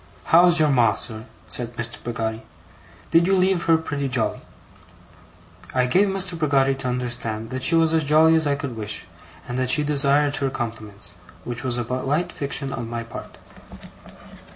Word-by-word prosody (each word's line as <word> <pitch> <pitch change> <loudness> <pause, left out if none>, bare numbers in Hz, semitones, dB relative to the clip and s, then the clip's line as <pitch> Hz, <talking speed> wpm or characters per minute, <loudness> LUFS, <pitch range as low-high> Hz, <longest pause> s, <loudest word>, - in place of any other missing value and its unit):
'How's 175 0 +6
your 155 -2 +3
Ma, 120 -5 +4
sir?' 110 0 -2 0.2
said 120 -1 -2
Mr. 120 0 -2
Peggotty. 115 -1 -3 0.7
'Did 170 +1 +4
you 195 0 +3
leave 185 -1 +2
her 165 -1 +5
pretty 145 -4 -3
jolly?' 125 -3 -1 1.3
I 125 -1 +3
gave 185 +11 +3
Mr. 190 -3 -1
Peggotty 135 -3 +2
to 135 -1 -3
understand 120 -3 -3
that 130 0 -4
she 165 - +2
was 165 -1 +3
as 160 -1 +3
jolly 155 +2 +5
as 160 -2 +3
I 140 - +1
could 140 -4 -5
wish, 105 -1 -4 0.4
and 125 +1 -3
that 130 -1 0
she 150 +3 +4
desired 145 0 +2
her 135 -1 0
compliments 110 -5 -6 0.3
which 120 0 -4
was 125 -2 -1
a 120 - -1
polite 135 +7 -1
fiction 140 -1 -4
on 115 -1 -5
my 115 0 -4
part. 115 - -10
135 Hz, 175 wpm, -23 LUFS, 120-160 Hz, 1.3 s, How's